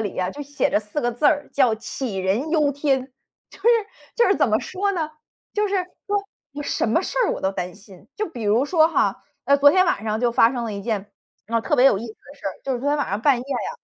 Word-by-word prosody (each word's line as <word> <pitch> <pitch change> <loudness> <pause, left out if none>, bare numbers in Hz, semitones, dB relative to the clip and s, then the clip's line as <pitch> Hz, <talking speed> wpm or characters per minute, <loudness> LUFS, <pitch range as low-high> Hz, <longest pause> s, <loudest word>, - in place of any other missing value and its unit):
里 205 -3 -3
呀， 185 0 -1
就 290 - -7
写 285 0 -1
着 - - +2
4 210 +7 -4
个 240 - 0
字 245 +5 -6
儿， 290 0 +3
叫 255 -5 +3
“杞 220 -3 -4
人 220 +12 0
忧 300 -3 +3
天”。 270 -2 0 0.4
就 - - -16
是 435 - +3 0.5
就 475 - +4
是 385 - +4
怎 - - +3
么 215 0 +3
说 400 +2 -2
呢， 320 -5 -2 0.4
就 420 0 +1
是， 400 0 0 0.3
说， 410 - 0 0.4
我 290 +1 -5
什 - - -1
么 230 +10 +2
事 - - -5
儿 - - +1
我 - - -5
都 190 - 0
担 180 -2 -5
心， 195 -2 -16
就 430 - -1
比 245 -8 -8
如 215 +4 +3
说 315 +1 +4
哈， 330 - 0 0.2
呃， 280 - +4
昨 285 +1 +7
天 370 +3 +4
晚 215 - 0
上 215 0 -1
就 245 -1 +2
发 235 +1 +4
生 245 - -3
了 225 - -3
一 200 - -6
件， 210 -3 -3 0.4
呃， 230 +1 0
特 - - +1
别 255 +2 +6
有 240 - +5
意 210 - -5
思 220 - -8
的 285 +5 -17
事 280 - -9
儿， 195 - -1
就 270 - -1
是 245 - -4
昨 280 - -1
天 295 +1 +1
晚 285 - -1
上 200 +2 -1
半 275 -2 +5
夜 - - -5
啊， 275 +2 -3
260 Hz, 290 characters per minute, -22 LUFS, 215-295 Hz, 0.5 s, 昨